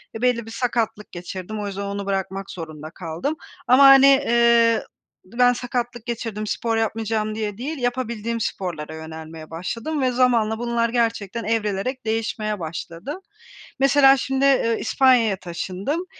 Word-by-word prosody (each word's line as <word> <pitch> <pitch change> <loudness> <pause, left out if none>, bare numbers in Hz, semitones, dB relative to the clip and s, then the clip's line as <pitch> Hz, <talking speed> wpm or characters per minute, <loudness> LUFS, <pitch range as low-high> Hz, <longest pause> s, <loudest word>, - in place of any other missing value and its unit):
ve 225 - -6
belli 245 -2 +1
bir 225 - -10
sakatlık 225 -3 -2
geçirdim. 185 +4 -6
O 205 - -3
yüzden 200 0 -5
onu 200 0 -4
bırakmak 195 0 -3
zorunda 155 -3 -8
kaldım 175 - -4 0.3
ama, 255 +3 +6
hani, 275 0 +8
ııı, 235 -1 +4 0.4
ben 245 +5 +3
sakatlık 245 -1 -4
geçirdim, 225 -3 -4
spor 225 +1 -1
yapmayacağım 220 -1 -1
diye 210 -2 -3
değil, 290 +7 -4
yapabildiğim 235 -2 -2
sporlara 165 -7 -4
yönelmeye 160 0 -9
başladım 230 - -4
ve 255 -1 +2
zamanla 240 -3 +2
bunlar 235 -1 0
gerçekten 230 -2 -1
evrilerek 220 +3 -2
değişmeye 220 -1 -2
başladı. 170 - -6 0.6
Mesela 275 0 +6
şimdi, 270 +2 0
ııı, 255 -4 +3
İspanya'ya 245 -5 +3
taşındım. 190 - -4
225 Hz, 135 wpm, -22 LUFS, 195-245 Hz, 0.6 s, hani